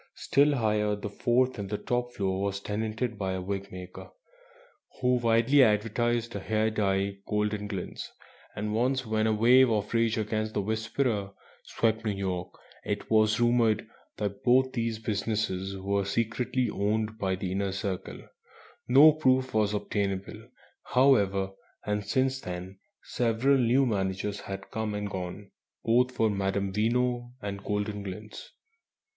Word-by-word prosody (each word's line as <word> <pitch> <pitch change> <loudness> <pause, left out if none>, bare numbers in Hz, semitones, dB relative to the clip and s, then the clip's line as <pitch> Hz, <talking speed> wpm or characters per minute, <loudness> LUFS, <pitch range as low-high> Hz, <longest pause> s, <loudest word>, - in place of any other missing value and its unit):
Still 145 +1 +3
higher, 105 -3 +1
the 105 0 -6
fourth 125 +3 +1
(and 100 -1 -4 0.2
top) 120 0 -1
floor 95 -2 -1
was 100 0 -1
tenanted 110 +2 -3
by 95 -2 -1
a 95 - -3
wig 100 +1 -4
maker 90 0 -9 0.9
who 125 0 +3
widely 120 +4 +4
advertised 115 +1 +1
a - - -2
hair 110 +2 0
dye 100 -2 0
"Goldenglints"; 105 -2 -3 0.5
and 105 +1 -3
once, 130 +3 +1
when 110 0 +1
a - - +2
wave 125 +4 +6
of 105 -1 -1
rage 115 -1 +2
against 110 0 -2
the 105 - +1
"Whisperer" 110 -1 -1 0.3
swept 110 -1 0
New 105 -2 0
York, 95 -2 -3 0.3
it - - -4
was 110 0 +4
rumoured 120 -3 +2 0.3
that 100 -1 -4
both 130 +1 +4
these 115 -2 -1
businesses 100 -3 -2
were 100 +1 0
secretly 120 +5 -1
owned 110 +1 -1
by 95 -3 0
the 95 -1 -4
Inner 100 0 -1
Circle. 95 -1 -4 0.7
No 140 +5 +8
proof 130 -4 +1
was 105 -2 +2
obtainable, 100 -2 -3 0.4
however, 100 -8 +3 0.3
and 105 0 -1
since 130 +5 0
then 90 +2 -7 0.2
several 125 +4 +1
new 125 +3 +3
managers 100 -2 -1
had 95 0 -7
come 110 -1 -2
and 105 0 -3
gone, 95 +2 -6 0.3
both 125 +2 +3
for 115 -3 +1
Madame 95 0 -1
Veno 120 +3 0
and 100 -2 -6
"Goldenglints." 105 0 -4
110 Hz, 140 wpm, -28 LUFS, 100-120 Hz, 0.9 s, No